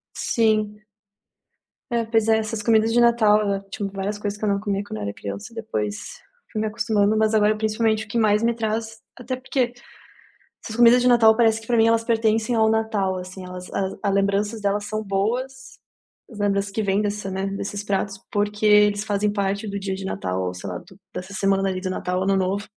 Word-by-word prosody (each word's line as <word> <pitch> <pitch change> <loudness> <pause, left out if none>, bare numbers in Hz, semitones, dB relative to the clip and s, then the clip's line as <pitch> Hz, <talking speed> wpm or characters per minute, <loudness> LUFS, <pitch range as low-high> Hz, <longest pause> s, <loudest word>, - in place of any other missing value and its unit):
Sim. 215 -2 +1 1.1
É, 235 -1 +1
pois 225 -1 +1
é, 220 0 +4
essas 220 0 -3
comidas 220 0 +3
de 240 - +3
Natal, 215 -4 +3
tinha 200 0 -4
várias 195 +1 -4
coisas 205 0 -3
que 215 - -11
eu 210 - +2
não 200 0 +1
comia 200 -1 -2
quando 110 - -6
eu 105 - -5
era 100 0 -3
criança 100 - -7
depois, 110 - -3 0.6
fui 215 - -3
me 220 - 0
acostumando. 215 -1 +1
Mas 220 0 +2
agora 215 0 +3
principalmente, 220 0 0
o - - -23
que 235 - -2
mais 215 -1 +3
me 235 - +2
traz 220 0 -3 0.2
até 250 +1 -4
porque, 255 -1 -1 0.9
essas 220 - -7
comida 240 +1 +7
de 250 - +1
Natal 230 -3 +6
parece 225 -1 +3
que 225 - -14
pra 240 - +2
mim 225 0 +5
elas 230 0 +3
pertencem 225 0 +1
ao 220 0 +4
Natal 220 -4 0
assim. 185 +1 -8
Elas 180 0 -9
as 190 -1 -2
a 200 - +1
lembranças 200 +2 0
delas 205 0 0
são 215 +1 -3
boas, 250 +7 -3 0.5
as 220 - -11
lembranças 200 -1 +1
das - - -19
que 220 - +1
vem 200 0 +1
dessa, 205 -1 -3
né, 190 +1 -2
desses 200 +1 -5
pratos 195 0 -2
porque 210 +1 0
eles 210 0 +5
fazem 205 0 0
parte 200 +1 -2
do 200 - -3
dia 195 -1 -3
de 190 0 -7
Natal 95 - -3
ou 90 0 -3
sei 90 +2 -7
lá, 90 - -4
do 190 - -17 0.2
dessa 185 +2 -6
semana 195 0 +1
ali 185 -1 -2
do 185 - -3
Natal 180 0 -2
ou 185 - 0
Ano 195 0 +2
Novo. 195 +2 -1
210 Hz, 215 wpm, -23 LUFS, 195-225 Hz, 1.1 s, comida